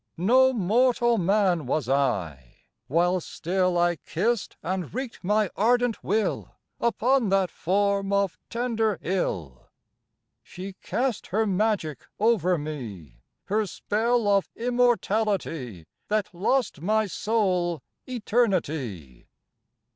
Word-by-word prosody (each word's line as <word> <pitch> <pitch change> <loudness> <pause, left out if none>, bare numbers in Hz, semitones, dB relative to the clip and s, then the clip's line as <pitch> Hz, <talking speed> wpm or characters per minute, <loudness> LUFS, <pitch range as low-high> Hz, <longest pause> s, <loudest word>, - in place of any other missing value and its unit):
No 255 +9 +5
mortal 240 +2 +2
man 185 -5 +2
was 135 -1 -1
I, 95 - -1 0.2
while 175 +5 +2
still 180 +2 -1
I 175 0 +2
kissed 205 - -2
and 185 -2 -3
wreaked 255 -2 -5
my 210 0 +1
ardent 240 +2 +2
will 215 +3 -1 0.2
Upon 235 0 +2
that 190 -2 +2
form 200 +2 0
of 200 -2 0
tender 225 -3 0
ill. 85 - -3 0.7
She 190 +2 -8
cast 255 -3 -2
her 220 +4 +1
magic 195 - -1
over 195 -5 +3
me, 115 - -7 0.2
Her 210 +1 0
spell 225 +4 0
of 200 -1 +2
Immortality, 210 - 0 0.2
That 210 -3 -1
lost 205 - 0
my 215 +4 +2
soul 185 - 0 0.3
Eternity. 160 - -1
195 Hz, 105 wpm, -26 LUFS, 165-225 Hz, 0.7 s, No